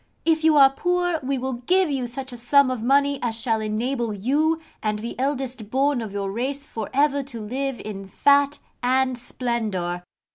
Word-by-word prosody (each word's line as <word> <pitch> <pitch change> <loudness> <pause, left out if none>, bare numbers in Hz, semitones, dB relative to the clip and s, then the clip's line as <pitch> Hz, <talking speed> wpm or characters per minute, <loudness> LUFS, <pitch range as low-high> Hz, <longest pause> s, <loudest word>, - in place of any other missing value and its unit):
If 320 -1 +2
you 315 -1 +5
are 270 -1 +8
poor, 355 +2 0
we 270 +1 -1
will 260 +1 -2
give 340 +8 +1
you 260 -3 -1
such 260 +2 -6
a - - -6
sum 260 +3 +4
of 250 -3 -3
money 280 +3 +3
as 230 -2 -1
shall 225 -2 0
enable 230 +1 -1
you 295 +10 +1 0.2
and 215 -1 -1
the 230 +3 -5
eldest 260 -5 -2
born 270 +1 +1
of 220 -3 -5
your 200 -1 -3
race 270 +6 -3
for 220 -7 -6
ever 280 +1 +2
to 260 -4 -8
live 260 +4 -3
in 195 -2 -7
fat 285 +7 +3 0.2
and 255 +1 +2
splendour. 220 -8 -2
260 Hz, 185 wpm, -24 LUFS, 225-280 Hz, 0.2 s, are